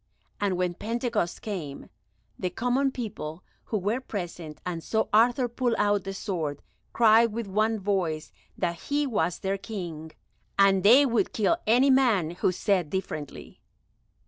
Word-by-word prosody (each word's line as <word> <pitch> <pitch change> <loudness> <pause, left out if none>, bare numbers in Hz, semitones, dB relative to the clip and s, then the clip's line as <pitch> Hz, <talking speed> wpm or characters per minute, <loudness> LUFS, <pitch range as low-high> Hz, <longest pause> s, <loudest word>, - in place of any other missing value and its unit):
And 195 -3 0
when 180 -1 0
Pentecost 230 -3 -2
came, 170 -10 -5 0.5
the 180 - -1
common 250 +7 0
people 180 -10 -6 0.2
who 220 - -1
were 210 +6 -1
present, 175 - -6
and 170 -3 -4
saw 220 -1 0
Arthur 245 +3 +4
pull 240 0 -1
out 205 -1 +1
the 195 - -4
sword, 160 -9 -3 0.3
cried 230 0 +5
with 230 +1 -3
one 215 +3 0
voice 185 -6 -1 0.3
that 170 -2 -2
he 290 +1 +1
was 180 -10 0
their 195 0 -2
King, 170 -7 -6 0.5
and 195 -1 +5
they 245 +9 +7
would 235 -4 0
kill 220 +10 +2
any 250 +5 +5
man 230 -11 +3
who 175 +1 0
said 185 -3 0
differently. 155 -6 -6
200 Hz, 145 wpm, -27 LUFS, 175-230 Hz, 0.5 s, they